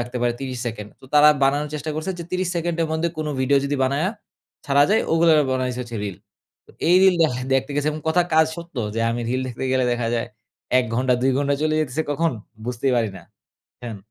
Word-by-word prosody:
রাখতে 120 +1 -5
পারে 120 -1 +2
৩০ 130 -2 -4
সেকেন্ড। 105 -3 -5
তো - - -16
তারা 150 0 +8
বানানোর 145 +2 +2
চেষ্টা 150 +1 -4
করছে 155 +5 -3
যে, 170 - -5
৩০ 185 -1 -1
সেকেন্ডের 165 -1 -1
মধ্যে 160 +2 0
কোনো 155 -1 -2
ভিডিও 140 +2 +3
যদি 145 +1 -1
বানায়া 140 +7 +1 0.6
ছাড়া 140 0 +4
যায়, 220 - +3
ওগুলা 165 0 +5 0.2
বানাইছে 130 -1 -1
হচ্ছে 120 -1 -7
রিল। 100 -3 -5 0.5
তো - - -17 0.2
এই 175 - +6
রিল 190 -1 +6
দেখা 125 -6 +1 0.2
দেখতে 135 +2 0
গেছি 145 +1 -1
এবং 155 - -6
কথা 175 +3 +3
কাজ 160 0 +5
সত্য। 170 -3 -10 0.2
যে 115 - -1
আমি 120 - -2
রিল 130 +2 0
দেখতে 125 +1 -5
গেলে 130 -1 +2
দেখা 120 -1 -1
যায় 115 0 -2 0.5
১ 130 - +2
ঘন্টা, 125 +1 +2
২ 135 - +3
ঘন্টা 140 0 +1
চলে 155 0 +1
যেতেছে 150 +1 -1
কখন, 165 +2 +1 0.3
বুঝতেই 125 +2 0
পারি 115 -3 +1
না। 90 - -11 0.6
হ্যান 115 -3 -6
140 Hz, 215 wpm, -22 LUFS, 125-160 Hz, 0.6 s, তারা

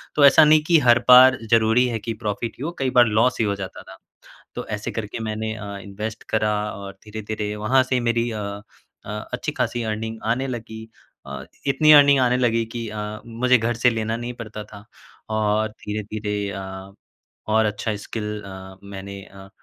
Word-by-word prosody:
तो 145 -1 +6
ऐसा 145 +3 +8
नहीं 155 0 +5
की 170 -2 +6
हर 120 0 +7
बार 130 +1 +9
ज़रूरी 115 +2 +4
है 115 -2 -2
की 115 +2 -4
प्रॉफ़िट 110 +2 -3
ही - - -5
हो, 170 - -2
कई 130 -1 +1
बार 120 - +8
लॉस 115 +4 +2
ही 110 - +2
हो 100 -1 0
जाता 95 -1 -7
था। - - -13 0.6
तो - - -5
ऐसे 105 - -5
करके 110 0 -5
मैंने 110 0 -3
अ, 105 -1 -8 0.2
इन्वेस्ट 105 +3 -6
करा 110 -1 +1 0.2
और 100 0 -8
धीरे-धीरे 105 0 -5
वहाँ 125 +5 +3
से 130 -1 0
मेरी 115 0 0
अ 110 -1 -4 0.6
अ, - - -8 0.2
अच्छी-खासी 120 - -2
अर्निंग 110 0 -4
आने 130 +3 0
लगी। 110 -3 -7 0.4
अ, 70 -1 -7 0.2
इतनी 155 +3 +5
अर्निंग 140 -2 +7
आने 125 0 +3
लगी 115 -2 +1
कि 115 -2 -4
अ, 105 0 -5
मुझे 125 +2 +2
घर 115 +2 -1
से 125 - +6
लेना 115 0 -2
नहीं 120 +1 -5
पड़ता 105 -1 -8
था। 100 -1 -13 0.5
और 110 0 +1
धीरे-धीरे 105 0 -5 0.2
अ, 95 0 -8 0.6
और 110 0 +3
अच्छा 105 0 -2
स्किल 105 -1 -5
अ, 95 0 -10
मैंने 100 0 -8
अ, 95 0 -14
110 Hz, 185 wpm, -22 LUFS, 105-120 Hz, 0.6 s, बार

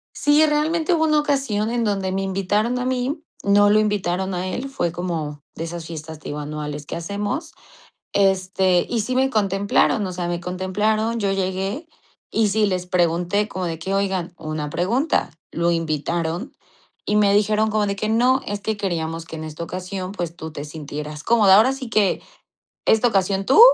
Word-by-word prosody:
Sí, 295 +2 +4
realmente 310 +3 +1
hubo 320 -1 +3
una 305 -1 +4
ocasión 270 -7 0
en 240 -1 0
donde 195 -3 0
me 195 +1 -1
invitaron 195 +5 0
a 250 - -2
mí, 260 +4 -1 0.2
no 205 +1 +5
lo 215 - +5
invitaron 190 -3 0
a 180 +1 -2
él, 250 +9 -4
fue 270 -11 -1
como 160 -4 -4
de 165 - -4
esas 165 0 -6
fiestas, 160 -1 -7
te - - -8
digo, 145 - -4
anuales 150 0 -5
que - - -5
hacemos. 205 - -3 0.6
Este, 190 -2 +2
y 235 -2 0
sí 250 +4 -2
me 265 +1 +2
contemplaron, 200 +1 +2
o 185 - -4
sea, 175 -1 -3
me 175 0 -2
contemplaron, 210 +6 0
yo 200 -2 +1
llegué 195 - -2 0.4
y 220 -2 +2
sí 210 +1 +2
les 180 -2 -1
pregunté 180 +3 +1
como 185 -3 -4
de 165 -2 -3
que: 190 +4 -3
"Oigan, 190 -3 -1
una 155 -2 -4
pregunta, 225 - 0 0.2
¿lo 170 +1 +1
invitaron?". 165 - -2 0.5
Y 210 - 0
me 205 -1 +4
dijeron 215 +1 +2
como 210 -1 +1
de 200 - -1
que: 215 +2 -2
"No, 250 +4 +3
es 205 0 -3
que 220 +1 -2
queríamos 165 -4 -2
que 165 - -8
en 155 - -6
esta 155 +1 -6
ocasión, 185 +2 -5
pues 175 -4 -4
tú 160 -1 -7
te 145 -2 -6
sintieras 150 0 -7
cómoda. 215 -5 +6
Ahora 225 +6 +5
sí 265 -3 -7
que 205 -4 +2 0.7
esta 220 +2 +4
ocasión 195 -2 +1
tú, 270 - +6
195 Hz, 185 wpm, -22 LUFS, 170-220 Hz, 0.7 s, cómoda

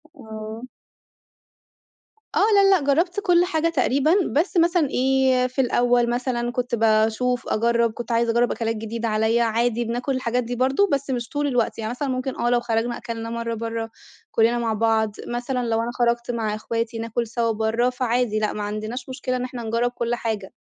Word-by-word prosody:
آه. 220 -2 -8 1.7
آه - - +3 0.2
لأ، 395 -1 +6
لأ، 380 -4 +4
جرّبت 350 +6 +1
كل 355 -4 +3
حاجة 330 -2 0
تقريبًا، 280 0 +2 0.2
بس 350 +5 +1
مثلًا 340 -3 +3
إيه 260 -1 +2
في 255 +2 -1
الأوّل 245 -1 +2
مثلًا 240 -1 -1
كنت 245 0 -1
باشوف 225 +2 +1
أجرّب 235 +1 +2
كنت 240 +1 -6
عايزة 230 0 +2
أجرّب 240 +1 +2
أكلات 225 -1 -2
جديدة 225 +1 -4
عليَّ، 220 +2 +2
عادي 235 +1 +1
بناكل 245 +4 -2
الحاجات 250 -1 -1
دي 240 +1 -4
برضو 265 +11 +2
بس 280 -3 -1
مش 240 -3 -2
طول 290 0 -1
الوقت، 245 -4 0
يعني 220 -1 -3
مثلًا 265 +4 -3
ممكن 255 +1 -2
آه 240 - +1
لو 245 0 +3
خرجنا 235 0 -1
أكلنا 230 -1 -6
مَرّة 230 0 -3
برّه 225 0 -4 0.4
كُلّنا 230 +1 +3
مع 225 -2 0
بعض، 220 -1 +1
مثلًا 245 +1 -2
لو 225 0 +1
أنا 235 +1 -3
خرجت 240 0 0
مع 220 -3 -2
إخواتي 230 +1 -3
ناكل 230 +1 -2
سوا 230 0 0
برّه، 225 +3 +1
فعادي 245 -3 0
لأ 215 -1 -1
ما 210 - -4
عندناش 215 +5 -5
مشكلة 255 -1 -3
إن 250 - -2
إحنا 250 -1 -6
نجرّب 230 +2 0
كُل 240 -1 -2
حاجة. 220 -5 -4
240 Hz, 185 wpm, -23 LUFS, 225-255 Hz, 1.7 s, لأ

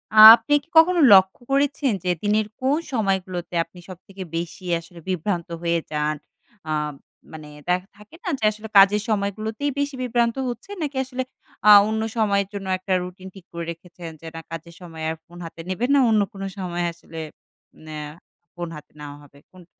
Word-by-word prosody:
আপনি 225 +7 +10
কি - - -27
কখনো 350 +2 +6
লক্ষ্য 190 +2 +5
করেছেন 280 -1 +1
যে 180 - -1
দিনের 210 +1 +1
কোন 275 +4 +2 0.2
সময়গুলোতে 190 -5 -2
আপনি 170 +2 -17
সবথেকে 185 +1 -10
বেশি 170 +2 -6 0.2
আসলে 170 +1 -14
বিভ্রান্ত 180 -1 -2 0.2
হয়ে 170 0 +1
যান? 150 0 0 0.5
আম 150 -1 -1 0.4
মানে 155 -1 -9 0.2
দ্যা 180 - +4 0.2
থাকে 210 +9 -16
না 380 - -3
যে - - -9
আসলে 215 +1 -9
কাজের 200 +2 +7
সময়গুলোতেই 215 +6 -1
বেশি 285 -1 -1
বিভ্রান্ত 235 -1 +1
হচ্ছেন? 395 - -7
নাকি 285 -2 -4
আসলে 260 0 -4 0.4
আ - - +9 0.2
অন্য 220 0 -1 0.2
সময়ের 200 -3 +2
জন্য 195 -1 -6
একটা 185 +1 -3
রুটিন 185 +1 -9
ঠিক 190 -3 -13
করে 170 -1 -5
রেখেছেন, 170 0 -10
যে - - -13
না 165 - -6
কাজের 165 +1 -8
সময় 165 -2 -9
আর 160 - -2
ফোন 175 +1 -15
হাতে 165 0 -9
নেবেন 230 +8 -1
না, 280 - +5
অন্য 215 -2 +4
কোন 195 - -9 0.2
সময় 175 -2 -3
আসলে 165 -1 -11 0.7
ন্যা 155 -1 -6 0.5
ফোন 175 -1 -5
হাতে 150 - -12
নেওয়া 145 -1 -8
হবে? 140 0 -19
কোনটা? 180 -2 -16
190 Hz, 175 wpm, -23 LUFS, 170-220 Hz, 0.7 s, আপনি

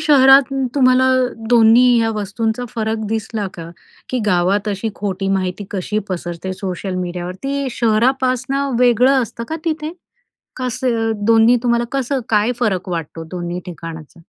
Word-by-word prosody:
शहरात 275 -2 +6 0.2
तुम्हाला 255 -1 +4 0.4
दोन्ही 235 +1 +6
ह्या 225 0 +1
वस्तूंचा 220 +3 -2
फरक 220 -1 -2
दिसला 220 -1 -3
का? 165 -1 -8 0.4
की 255 - 0
गावात 195 +2 +1
अशी 205 +2 -2
खोटी 195 -1 -3
माहिती 190 0 -1
कशी 205 +2 -2
पसरते 175 0 -4
सोशल 185 0 -5
मीडियावरती? 185 +11 -3
शहरापासनं 255 +3 0
वेगळं 250 +2 +4
असतं 230 +1 -6
का 320 - -3
तिथे? 315 -1 -2 0.6
कसं? 250 -3 -1
दोन्ही 230 +2 +5
तुम्हाला 235 -1 +1
कसं 270 0 -1
काय 215 +2 +2
फरक 190 -6 0
वाटतो, 165 -1 -5
दोन्ही 175 0 -4
ठिकाणाचा? 165 -1 -9
225 Hz, 130 wpm, -18 LUFS, 185-255 Hz, 0.6 s, शहरात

